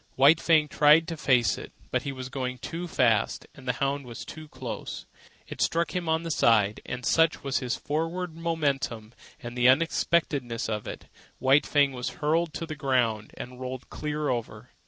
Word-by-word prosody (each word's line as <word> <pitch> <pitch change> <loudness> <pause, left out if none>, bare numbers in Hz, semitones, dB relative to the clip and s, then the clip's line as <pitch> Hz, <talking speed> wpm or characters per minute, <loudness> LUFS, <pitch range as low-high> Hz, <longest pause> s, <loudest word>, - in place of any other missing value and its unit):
White 145 +5 +6
Fang 155 -3 +4
tried 150 +2 +5
to 165 - -3
face 125 -8 +2
it. - - -9 0.2
But - - +1
he 140 - -4
was 130 -1 -7
going 130 -1 -3
too 170 +6 -5
fast, 115 -8 +1
and 135 -2 -14
the 125 - +2
hound 135 +1 -2
was 120 - -8
too 155 0 -9
close. - - -6 0.4
It - - -7
struck 170 +2 +1
him 175 -3 -2
on 160 +1 +1
the 165 - -3
side; 110 -7 +3
and 125 -1 -5
such 165 +3 +3
was 135 -1 0
his 125 -3 -2
forward 165 +3 -3
momentum 140 -9 -2 0.3
and 120 0 -8
the 125 0 +5
unexpectedness 140 -4 +1
of 105 -1 -3
it, - - -7 0.3
White 135 +2 +4
Fang 145 -2 +3
was 125 -2 -5
hurled 160 +2 +1
to 165 - -3
the 160 - -6
ground 125 -7 0
and 125 0 -8
rolled 130 0 -6
clear 150 0 -2
over. 115 -1 -4
135 Hz, 185 wpm, -27 LUFS, 125-160 Hz, 0.4 s, White